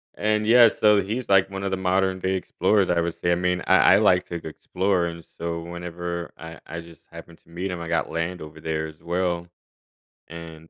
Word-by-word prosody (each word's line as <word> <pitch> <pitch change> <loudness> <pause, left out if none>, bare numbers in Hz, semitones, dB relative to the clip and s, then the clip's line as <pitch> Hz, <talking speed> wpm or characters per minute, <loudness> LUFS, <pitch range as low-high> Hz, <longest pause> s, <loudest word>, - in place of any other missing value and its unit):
And 105 0 0
yeah. 120 +1 +7
So 105 -2 +3
he's, 110 +5 -4
like, 95 -1 +4
one 95 0 -6
of 100 - -2
the 95 - -1
modern-day 95 0 0
explorers, 95 +1 +1
I 85 -1 +2
would 85 0 -2
say. 85 +1 -1
I - - +4
mean, 90 0 0
I - - +5 0.2
I - - +6
like 90 0 +4
to 85 - -5
g 80 - -9
explore. 90 +3 -1
And 85 0 -6
so 85 0 -5
whenever 85 0 -6
I 80 0 -10
I 85 - -6
just 85 -2 -17
happened 85 - -12
to - - -28
meet 90 +3 -4
him. 90 - -5
I 85 - -6
got 85 0 -1
land 85 +2 -3
over 80 0 -10
there 80 0 -3
as 80 0 -14
well. 85 0 -2 0.8
And, 80 -1 -11
85 Hz, 220 wpm, -24 LUFS, 85-95 Hz, 0.8 s, yeah